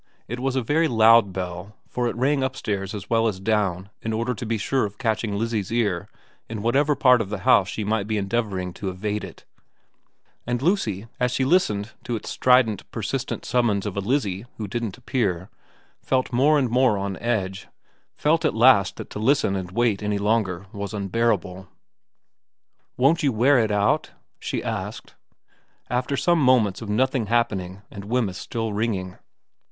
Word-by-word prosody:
It 120 +2 -5
was 135 +1 -1
a 130 - 0
very 160 +7 +2
loud 115 -4 +5
bell, 90 +2 -6
for 125 -1 -1
it - - -3
rang 135 +4 +1
upstairs 105 -7 -3
as 100 -2 -7
well 115 0 +2
as 100 -4 -2
down 100 -2 -1
in 110 - -3
order 115 +3 -1
to 120 0 -6
be 115 0 0
sure 130 +5 0
of 100 -1 -4
catching 110 -4 -1
Lizzie's 110 -2 -2
ear 105 -7 0 0.4
in 110 -2 -5
whatever 140 +5 +2
part 125 -3 +5
of 100 - -4
the 105 -2 -4
house 95 -1 +5
she 110 - -3
might 105 0 -1
be 110 -1 -1
endeavouring 95 -3 -2
to 95 - -4
evade 105 +3 -3
it, - - -11 1.0
and 120 0 0
Lucy, 120 - 0
as 125 -1 +1
she 130 +1 0
listened 120 - +1
to 120 - -3
its 110 - -6
strident, 125 -5 +3
persistent 125 +4 -4
summons 115 -5 +1
of 105 - -4
a - - -1
Lizzie 105 -2 -1
who 105 - -4
didn't 115 +1 -4
appear, 100 -8 -2 0.5
felt 130 -1 0
more 145 +5 +4
and 130 -5 0
more 125 -3 +3
on 100 0 -3
edge, 95 -5 -2 0.5
felt 160 +2 +2
at - - +1
last 110 -6 +5
that - - -9
to - - -5
listen 110 -4 +2
and 95 -2 -4
wait 110 0 +1
any 105 -1 -1
longer 100 -3 0
was 100 0 -5
unbearable. 100 -2 -1 0.7
' - - -51
Won't 140 +7 +3
you 145 -3 +2
wear 125 +4 +4
it 110 -2 +1
out? 105 0 +1 0.2
' - - -51
she - - -3
asked, - - -5 0.8
after 125 +3 -1
some 170 +3 +2
moments 125 -7 +3
of 110 - -6
nothing 125 +1 +1
happening 100 -4 -1
and 100 -2 -8
Wemyss 110 -4 -1
still 115 -2 -3
ringing. 100 -4 -2
110 Hz, 180 wpm, -24 LUFS, 100-125 Hz, 1.0 s, loud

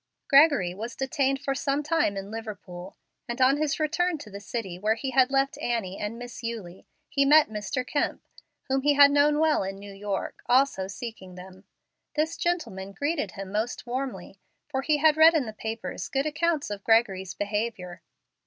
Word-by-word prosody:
Gregory 275 - +5
was 225 +5 -6
detained 270 0 0
for 275 0 -2
some 280 +1 -1
time 300 -10 +1
in 195 +1 -6
Liverpool, 195 -5 -8 0.3
and 240 +2 -4
on 260 +2 +5
his 305 0 -1
return 335 +2 0
to 215 -8 -11
the 200 - -7
city 195 -3 -5
where 215 +3 +1
he 265 +3 -4
had 260 0 +4
left 275 0 0
Annie 210 -6 -2
and 210 +2 -4
Miss 245 -1 -8
Eulie 220 -6 -6 0.2
he 275 - +1
met 300 0 +6
Mr. 210 +4 -3
Kemp, 285 - -1 0.4
whom 270 0 0
he 290 +1 +3
had 285 0 +8
known 290 +1 +4
well 315 0 +3
in 195 0 -4
New 200 0 -10
York, 200 0 -4
also 250 -7 +3
seeking 195 -4 -8
them. 185 +1 -12 0.5
This 310 +2 0
gentleman 225 - -3
greeted 290 +5 -2
him 195 -2 -7
most 215 +4 -2
warmly, 255 +2 -5 0.3
for 270 -3 -2
he 300 +2 +2
had 310 +1 +4
read 325 +1 +7
in 295 -5 +2
the 220 - -6
papers 220 +1 -5
good 270 +1 0
accounts 310 -4 0
of 200 -1 -5
Gregory's 195 -5 +2
behavior. 205 -3 -3
240 Hz, 180 wpm, -26 LUFS, 200-285 Hz, 0.5 s, had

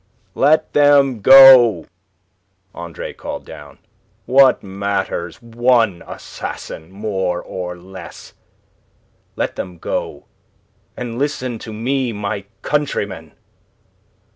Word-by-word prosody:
"Let 155 +2 +2
them 140 -4 +4
go!" 125 -7 +8 0.9
Andre 85 -2 -8
Louis - - -10
called - - -8
down... - - -12 0.5
"What 135 0 +4
matters 95 -3 -4
one 115 -4 +1
assassin 80 +1 -8
more 95 -3 -3
or 90 -1 -6
less? 90 -1 -12 1.0
Let - - -3
them 90 -1 -6
go, - - -5 0.7
and 120 -1 -6
listen 130 -5 -3
to 110 - -9
me, 125 +3 -2
my 100 -1 -4 0.2
countrymen!" 100 - -3
110 Hz, 95 wpm, -18 LUFS, 95-130 Hz, 1.0 s, go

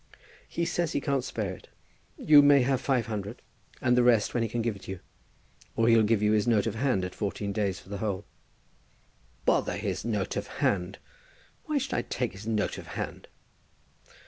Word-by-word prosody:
"He 170 - -2
says 170 -1 -1
he - - +1
can't 140 -2 0
spare 105 -6 -3
it. - - -13 0.5
You 150 -1 +7
may 145 -2 +6
have 130 0 +1
£500, 115 -5 -1 0.5
and 125 -1 +4
the 125 - +5
rest 120 -4 +3
when 120 - +1
he 115 - 0
can 115 +1 -2
give 115 -2 -1
it 100 - -13
you. 95 -2 -5 0.8
Or 115 0 +2
he'll 115 -1 +6
give 110 -1 +2
you 105 - +3
his 110 +1 +2
note 110 -4 +3
of 115 - -1
hand 115 -6 0
at 90 - -6
fourteen 100 -1 -3
days 100 -2 -1
for - - -17
the 100 -1 -5
whole." 100 -2 -2 1.2
"Bother - - +2
his - - -3
note 105 -5 -2
of - - -3
hand. 90 -1 0 0.7
Why 305 -2 0
should 265 -1 -2
I - - +1
take 125 -2 -3
his 105 +3 -10
note 110 -2 -1
of - - -11
hand?" - - -5
115 Hz, 195 wpm, -28 LUFS, 100-125 Hz, 1.2 s, You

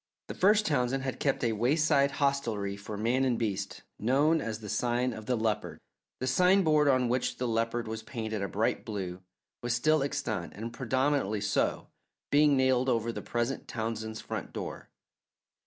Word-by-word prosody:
The - - -3
first 210 +3 +4
Townsend 130 -2 +1
had 130 -1 -3
kept 135 -2 0
a 115 - +2
wayside 140 +5 +2
hostelry 120 -9 0
for 100 +1 -7
man 120 +5 +1
and 125 -3 +1
beast, 100 -4 -3 0.2
known 145 +8 +3
as 110 -2 -3
the 105 - -8
"Sign 125 +3 0
of 110 -1 -9
the 125 - +2
Leopard." 105 -7 -1 0.4
The 130 - -2
sign 180 +8 +4
board, 155 -2 +4
on 130 -3 +3
which 125 +1 0
the 125 - -1
leopard 115 +1 -1
was 110 0 -4
painted 110 -2 -4
a 100 - -1
bright 105 +3 0
blue, 95 -4 -5 0.4
was 120 0 0
still 155 +5 +3
extant, 140 - -2
and 115 +4 -6
prominently 130 -4 0
so, 105 - 0 0.4
being 145 -1 +5
nailed 130 0 +3
over 115 -1 +1
the - - -6
present 120 +3 -2
Townsend's 110 -1 -4
front - - -5
door. - - -6
120 Hz, 170 wpm, -30 LUFS, 110-140 Hz, 0.4 s, being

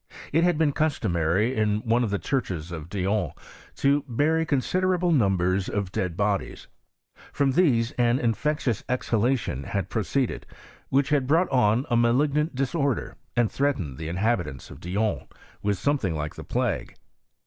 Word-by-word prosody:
It 165 +2 +4
had 175 -2 +3
been 155 -2 +3
customary 105 - +1
in 105 -1 +1
one 120 +2 +2
of 115 - 0
the 100 - 0
churches 90 - -2
of 80 -1 -7
Dijon 100 -3 -1 0.4
to 140 +1 +2
bury 155 +6 +1
considerable 180 +5 +1
numbers 95 - +2
of 100 -2 -2
^^ - - -24
dead 90 -3 -2
bodies. 100 -1 -1 0.7
From 140 -1 +1
these 130 -7 +3
an 120 0 +3
infectious 125 0 0
exhalation 120 - 0
^Mbad 95 +4 -3
proceeded, 120 +4 -1 0.4
which 140 +2 +2
had 145 -4 +2
brought 165 +5 +3
on 125 0 +3
a - - +4
malignant 140 +6 +2
^Bdisorder, 135 -1 -1 0.2
and 120 -3 +2
threatened 95 - -1
the 80 - -4
inhabitants 90 - -1
of - - -10
Dijon 95 -3 -2 0.4
H^ivith 105 0 +1
something 105 - 0
like 75 0 -3
the - - -9
plague. - - -2
115 Hz, 150 wpm, -26 LUFS, 95-140 Hz, 0.7 s, It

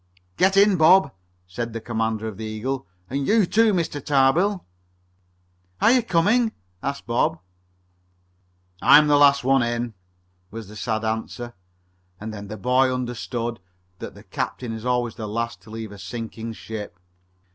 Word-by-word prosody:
"Get 190 +1 +3
in, 200 -1 +5
Bob," 160 -1 +6 0.3
said 115 +6 -5
the 115 - -3
commander 110 -1 -2
of 105 -3 -7
the 110 - -6
Eagle. 110 +3 -4 0.2
"And 135 +4 -2
you 215 -2 +4
too, 225 +4 +3
Mr. 165 -7 -2
Tarbill." 160 +8 +2 1.1
"Aren't 235 - +5
you 255 - +4
coming?" 220 +4 +2 0.3
asked 140 0 -4
Bob. 140 +7 +1 1.4
"I'm 150 +1 +7
the 150 -1 +4
last 140 -1 +5
one 135 +1 +4
in," 120 0 -2 0.6
was 110 0 -8
the 105 - -12
sad 110 0 -2
answer, 115 +2 -4 0.7
and 110 +1 -6
then 100 -1 -8
the 110 +2 -7
boy 130 +5 +2
understood 120 -2 -3 0.4
that - - -8
the - - -13
captain 120 -3 -4
is 110 +1 -7
always 120 -2 0
the 110 -3 -6
last 115 +2 -3
to - - -16
leave 110 -1 -7
a 100 - -11
sinking 115 +3 -6
ship. 110 -3 -7
120 Hz, 155 wpm, -23 LUFS, 110-150 Hz, 1.4 s, I'm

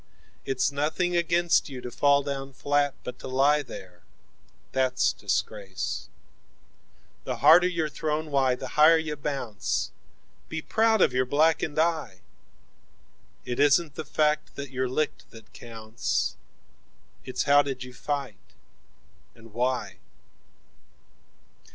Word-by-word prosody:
11It's 135 0 +1
nothing 155 +5 -1
against 170 -1 +2
you 130 -2 -7
to 125 - -7
fall 140 +2 +3
down 135 -1 -5
flat,12 145 +1 0
But 125 0 -7
to - - -8
lie 140 +3 +3
there 90 -10 -11 0.7
that's 130 -1 +1
disgrace.13The 95 -3 -6
harder 165 +5 +7
you're 165 -3 -1
thrown, 155 0 -3
why 135 -2 +2
the 130 0 -7
higher 155 +4 +6
you 160 -2 -3
bounce;14 135 -7 -5
Be 160 - -3
proud 220 -2 +2
of - - +2
your 130 0 +1
blackened 155 +2 +2
eye!15It 150 - -6
isn't 145 +2 +3
the 160 - -5
fact 150 0 0
that 140 -1 -7
you're 130 -1 -1
licked 150 +4 -2
that 115 -1 -16
counts,16 115 -1 -3 0.9
It's 130 - -2
how 145 0 +6
did 135 -3 -4
you 125 0 -10
fight 135 -5 -5 0.8
and 115 -2 -16
why? 125 +2 -1
140 Hz, 120 wpm, -26 LUFS, 125-155 Hz, 0.9 s, harder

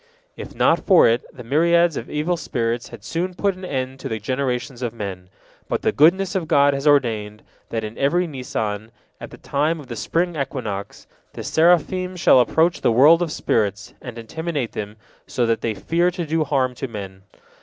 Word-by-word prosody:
If - - -9
not - - +3
for 190 -4 +6
it, 115 +1 +1
the 125 - -11
myriads 170 +5 +3
of - - -6
evil 155 +4 -1
spirits 120 -6 -2
had 115 -4 -12
soon 175 +10 -3
put 200 +1 +1
an 185 +1 -13
end 130 -5 -4
to - - -6
the 110 - -2
generations 125 +2 -3
of 120 -2 -3
men. 95 -4 -6 0.4
But - - -2
the - - +2
goodness 180 +6 +3
of 185 -5 -2
God 145 -3 +4
has 140 +2 -2
ordained, 110 -7 +1 0.3
that 115 -1 -3
in 110 +1 -7
every 175 +6 +2
Nisan, 110 -7 -4 0.3
at - - -8
the - - -12
time 155 +4 -1
of 145 - -10
the 120 - -5
spring 170 +8 -1
equinox, 110 -8 -5 0.3
the - - -7
seraphim 180 +3 +2
shall 170 -6 +5
approach 160 +7 +2
the - - +3
world 150 +9 +6
of 170 -3 -1
spirits, 105 -6 -1
and 120 -2 -8
intimidate 145 +2 -4
them 105 0 -6 0.3
so 120 - 0
that 115 -1 0
they 115 -2 -2
fear 170 - +1
to 175 -1 -4
do 160 0 0
harm 130 -3 0
to 135 - -5
men. 100 -4 -8
135 Hz, 195 wpm, -21 LUFS, 115-165 Hz, 0.4 s, for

